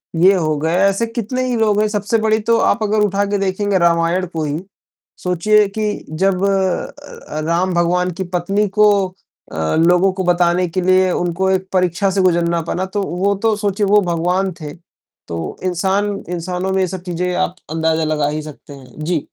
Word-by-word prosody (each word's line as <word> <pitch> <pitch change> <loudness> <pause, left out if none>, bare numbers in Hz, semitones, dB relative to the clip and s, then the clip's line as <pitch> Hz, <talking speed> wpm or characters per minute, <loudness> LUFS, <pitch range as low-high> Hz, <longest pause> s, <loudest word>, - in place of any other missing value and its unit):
ये 185 +4 +5
हो 155 -4 0
गए, 160 +2 0
ऐसे 195 +4 -1
कितने 240 +2 -3
ही 245 - 0
लोग 210 -2 +2
हैं, 215 - +2
सबसे 210 +2 0
बड़ी 220 0 +2
तो 230 0 +4
आप 220 - +2
अगर 215 +1 +1
उठा 200 0 0
के 205 0 -1
देखेंगे 195 0 0
रामायण 170 +2 +2
को 160 -1 -2
ही। 150 +2 -2 0.6
सोचिए 200 +4 +3
कि 210 -1 0 0.2
जब 190 +3 0
अ 190 -2 0 0.4
अ, - - -1
राम 175 +2 +1
भगवान 180 +1 +1
की - - 0
पत्नी 195 +4 0
को 210 - +7 0.6
अ, 80 0 -1
लोगों 175 +4 +4
को 190 0 -3
बताने 175 0 +2
के 185 +2 -2
लिए 185 0 +3
उनको 180 +2 -1
एक 190 0 0
परीक्षा 185 +1 +1
से 190 0 +1
गुज़रना 170 -2 +2
पड़ा 185 +1 -1
तो, 200 +1 -3
वो 195 +2 0
तो 220 -1 +3
सोचिए 205 0 -1
वो 210 +1 +5
भगवान 180 +3 0
थे। 150 -1 -6 0.5
तो 85 -1 -5
इंसान 195 +3 0
इंसानों 180 +2 -3
में 190 - +1
ये 185 - +1
सब 185 0 -6
चीज़ें 180 0 -2
आप 185 -1 -1 0.2
अंदाज़ा 160 0 0
लगा 150 -2 0
ही 155 +1 -3
सकते 150 -1 -11
हैं। 135 +2 -11
जी। 165 -4 -1
185 Hz, 190 wpm, -18 LUFS, 170-200 Hz, 0.6 s, को